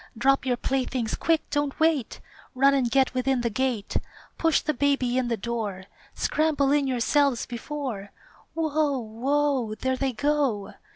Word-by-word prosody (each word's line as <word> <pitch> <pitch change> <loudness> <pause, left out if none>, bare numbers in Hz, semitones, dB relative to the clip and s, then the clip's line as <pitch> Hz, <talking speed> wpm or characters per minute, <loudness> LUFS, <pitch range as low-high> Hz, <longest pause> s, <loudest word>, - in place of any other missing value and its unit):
Drop 270 +3 +2
your 245 -1 +1
playthings! 255 -3 -1
Quick! 325 -1 +1
don't 290 -1 -1
wait! 315 -6 +1 0.3
Run 275 +2 +5
and 260 -3 +2
get 265 +2 +2
within 255 0 +1
the 235 -1 -1
gate! 240 -2 -1 0.4
Push 325 -2 +3
the 305 - -1
baby 275 -3 +1
in 255 -1 +1
the 230 -1 -1
door, 215 -4 -4 0.3
Scramble 300 -3 +1
in 290 -1 +2
yourselves 265 +1 +2
before 240 -5 -5 0.4
Whoa! 310 -3 +1
Whoa! 255 +1 0
There 260 +4 -1
they 270 0 0
go! 275 -6 0
265 Hz, 150 wpm, -26 LUFS, 235-290 Hz, 0.4 s, Run